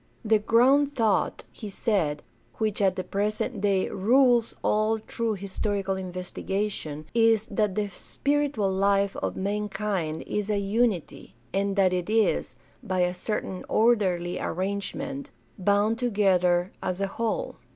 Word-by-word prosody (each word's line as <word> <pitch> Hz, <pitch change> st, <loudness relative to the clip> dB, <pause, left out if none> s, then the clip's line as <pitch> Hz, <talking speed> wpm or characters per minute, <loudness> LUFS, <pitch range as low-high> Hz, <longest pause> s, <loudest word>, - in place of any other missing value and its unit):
The 220 Hz, 0 st, +4 dB
ground 265 Hz, +7 st, +4 dB
thought, 225 Hz, -4 st, +1 dB
he 215 Hz, -, -8 dB
said, 190 Hz, -9 st, 0 dB, 0.3 s
which 215 Hz, -2 st, -1 dB
at 190 Hz, -2 st, +3 dB
the 185 Hz, -, -3 dB
present 210 Hz, +2 st, -2 dB
day 195 Hz, -2 st, +2 dB
"rules 240 Hz, +3 st, +3 dB
all 215 Hz, +1 st, +2 dB
true 220 Hz, 0 st, -2 dB
historical 195 Hz, 0 st, -2 dB
investigation" 185 Hz, -3 st, -4 dB
is 225 Hz, -2 st, +4 dB
" -, -, -18 dB
that 210 Hz, -4 st, 0 dB
the 210 Hz, -1 st, 0 dB
spiritual 280 Hz, -1 st, -1 dB
life 195 Hz, +1 st, +2 dB
of -, -, -3 dB
mankind 195 Hz, -4 st, -2 dB
is 210 Hz, 0 st, -2 dB
a 210 Hz, -, +1 dB
unity, 200 Hz, -, -1 dB, 0.2 s
and 195 Hz, 0 st, 0 dB
that 190 Hz, -2 st, +3 dB
it 180 Hz, +1 st, -2 dB
is, 220 Hz, 0 st, +1 dB, 0.3 s
by 190 Hz, -6 st, -1 dB
a 180 Hz, 0 st, +2 dB
certain 185 Hz, 0 st, -4 dB
orderly 190 Hz, -7 st, +2 dB
arrangement, 200 Hz, +9 st, -3 dB, 0.3 s
bound 205 Hz, +4 st, +2 dB
together 190 Hz, -6 st, +2 dB
as 185 Hz, 0 st, -2 dB
a 200 Hz, -, +1 dB
whole. 230 Hz, -, -3 dB
205 Hz, 135 wpm, -26 LUFS, 190-220 Hz, 0.3 s, The